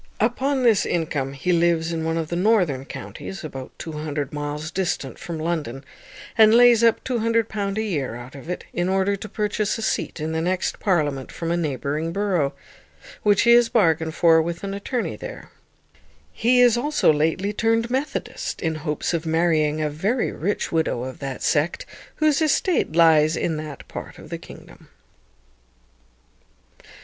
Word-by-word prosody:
Upon 260 +4 +1
this 225 -5 +4
income 145 -5 -2
he 140 +7 -1
lives 170 -1 +2
in 160 -1 -2
one 160 0 -1
of 160 -2 -3
the 170 - -2
northern 175 - +2
counties, 190 +6 -8
about 135 -4 -7
200 150 -3 -4
miles 150 +2 -4
distant 175 -8 -2
from 170 -2 -5
London, 155 -5 -3 0.5
and 220 0 +6
lays 240 -1 +6
up 230 -1 +3
£200 225 -4 -1
a 220 - 0
year 145 - -2
out 120 +1 -9
of 140 +4 -10
it, 180 - -4
in 175 +1 0
order 195 +1 +1
to 210 +2 -8
purchase 210 0 -1
a 225 - -5
seat - - -2
in 155 +1 -3
the 160 0 -1
next 180 +2 -1
parliament 150 -8 0
from 165 0 -4
a - - +2
neighbouring 150 0 -2
borough, 180 -7 0 0.7
which 205 -2 +3
he 235 - +5
has 240 -1 +6
bargained 160 -6 +2
for 165 -2 +5
with 170 +2 -4
an 195 0 -3
attourney 230 +5 -3
there. - - -9 0.8
He 245 +2 +3
is 240 -1 +5
also 290 - +3
lately 165 +7 0
turned 225 +2 +1
Methodist, 275 +2 -3
in 160 -2 -1
hopes 150 +2 -2
of 165 -1 -2
marrying 160 -2 +2
a 150 - 0
very 205 - 0
rich 200 +7 -2
widow 160 -7 0
of 130 0 -7
that 135 -2 -5
sect, 155 +3 0 0.3
whose 310 -1 +2
estate 315 - +1
lies 160 -1 +5
in 160 -2 -1
that 155 -2 -8
part - - -8
of - - -13
the - - -4
kingdom. - - -14
170 Hz, 165 wpm, -23 LUFS, 155-215 Hz, 0.8 s, and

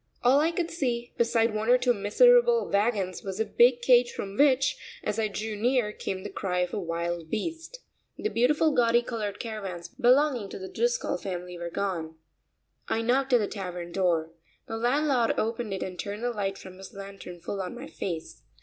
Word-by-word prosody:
All 255 +3 +5
I 315 +2 +3
could 340 0 -2
see, 245 -7 -2
beside 230 -1 +2
one 215 +2 -2
or 250 - +7
two 250 -1 +2
miserable 475 - +4
wagons, 200 -3 0
was 195 +1 -6
a 220 - +2
big 240 +1 +4
cage 245 -1 +5
from 195 0 -6
which, 275 +1 +4 0.3
as 210 - -2
I 220 - +2
drew 215 +1 -4
near, 235 0 +1
came 190 -2 -5
the 205 - -6
cry 180 -2 -1
of 180 0 -2
a 215 - -1
wild 170 -1 -3
beast. 330 - -5 0.3
The 425 - -2
beautiful 300 - +3
gaudy 240 -2 +3
colored 215 -4 -4
caravans 195 -7 -6
belonging 250 -3 +2
to - - -7
the 190 - -7
Driscoll 485 +1 0
family 180 -2 -6
were 170 0 -5
gone. 170 -4 -3 0.7
I 225 - 0
knocked 265 +3 +1
at - - +8
the 210 - 0
tavern 180 -4 -6
door. 170 -4 +1 0.4
The 225 - -4
landlord 250 0 +2
opened 225 0 -2
it 195 - -2
and 180 -2 -7
turned 205 +2 -5
the 245 - 0
light 195 -3 -2
from 185 0 -12
his 195 - -11
lantern 195 -3 -9
full 195 +4 -4
on 180 - -5
my - - -8
face. 165 -4 -6
220 Hz, 195 wpm, -27 LUFS, 190-245 Hz, 0.7 s, at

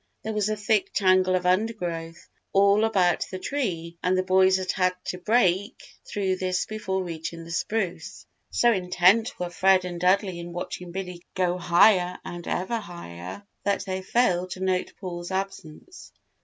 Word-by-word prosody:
There 220 - -3
was 210 -1 0
a 215 - 0
thick 210 0 0
tangle 185 -1 +3
of 180 0 -1
undergrowth 180 -4 -1 0.3
all 200 +2 +5
about 185 -6 +2
the 185 - -5
tree 175 - -3
and 185 +1 +1
the 185 - +2
boys 190 0 +4
had 185 -1 -2
had 185 -1 +1
to 180 - -4
break 200 -1 +1 0.3
through 190 -2 -1
this 185 -1 -1
before 190 -3 -3
reaching 165 -1 -6
the 165 - -10
spruce. 180 -2 -3 0.2
So 240 - +3
intent 185 +3 +3
were 175 -1 -3
Fred 185 +1 +3
and 175 -1 -5
Dudley 185 -1 +2
in 170 0 -7
watching 175 0 -6
Billy 180 -1 -6
go 180 -1 +1
higher 180 +1 +4
and 175 -1 -7
ever 225 +6 -1
higher, 90 - -9 0.2
that 200 -1 0
they 190 -1 -3
failed 185 -4 +1
to - - -10
note 185 -1 0
Paul's 175 -2 -6
absence. 195 - -6
185 Hz, 165 wpm, -26 LUFS, 175-200 Hz, 0.3 s, all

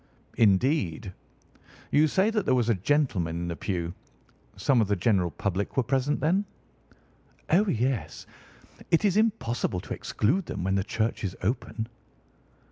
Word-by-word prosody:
"Indeed! 100 - +2 0.8
You 155 +2 +5
say 190 +8 +2
that 215 -3 0
there 130 - +4
was 120 -2 +1
a - - +5
gentleman 100 - 0
in 85 - -3
the 85 - -3
pew. 85 +1 -3 0.6
Some 130 -4 +3
of 105 - +1
the 100 - +1
general 95 -2 +2
public 100 - -3
were 130 - +4
present, 135 +4 0
then?" 175 +8 +2 1.1
"Oh, 200 +6 +4
yes. 125 - -1 0.6
It 165 +5 +3
is 195 -2 +3
impossible 200 - 0
to - - -6
exclude 160 - 0
them - - -4
when 95 +1 0
the 95 -1 +1
church 110 +2 -2
is 95 -2 -3
open." 110 +1 -2
115 Hz, 150 wpm, -27 LUFS, 95-150 Hz, 1.1 s, You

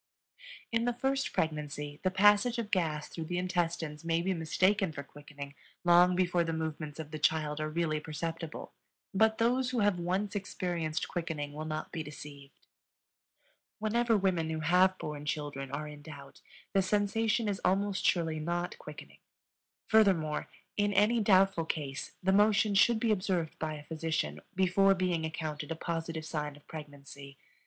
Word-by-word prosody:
In 230 0 +1
the 245 - +1
first 270 +2 0
pregnancy 150 -2 -2
the 185 - +2
passage 205 +5 +4
of 225 -2 -3
gas 155 -5 0
through 165 - -6
the 175 +2 -3
intestines 170 -4 -1
may 165 0 +1
be 190 +1 +1
mistaken 185 +3 +2
for 140 -2 -6
quickening 145 0 -10 0.3
long 175 +1 +6
before 180 -1 +2
the 165 - -2
movements 155 -2 -4
of 155 -1 -6
the 155 - -5
child 150 -1 +1
are 155 - -1
really 155 -1 0
perceptible; 165 +1 -5 0.4
but 220 +2 +3
those 245 +2 +2
who 250 -3 0
have 205 -3 +2
once 185 +4 -1
experienced 175 -5 -2
quickening 160 -5 -4
will 155 +1 -5
not 155 0 -4
be 160 - -3
deceived. 145 -2 -11 1.1
Whenever 230 +1 +2
women 180 -5 +1
who 160 0 -2
have 180 +4 +4
borne 150 -3 -5
children 145 -2 -3
are 145 +3 -4
in 150 -1 -10
doubt 140 -3 -11 0.3
the 195 - +4
sensation 210 +3 +1
is 200 -2 -2
almost 195 +1 +1
surely 165 -3 +1
not 175 +3 -2
quickening. - - -11 0.7
Furthermore, 185 -9 +3 0.3
in 205 0 +2
any 215 +4 +4
doubtful 195 -4 +4
case, 145 -4 -4
the 190 +1 +3
motion 210 +1 +4
should 220 +3 +5
be 225 0 +2
observed 185 -5 -1
by 155 -1 -2
a 150 - -9
physician 155 - -2
before 190 +1 +4
being 180 -3 0
accounted 155 -1 -4
a - - -1
positive 165 -1 -4
sign 150 -2 -3
of 145 - -19
pregnancy. 140 -2 -10
165 Hz, 160 wpm, -31 LUFS, 155-195 Hz, 1.1 s, long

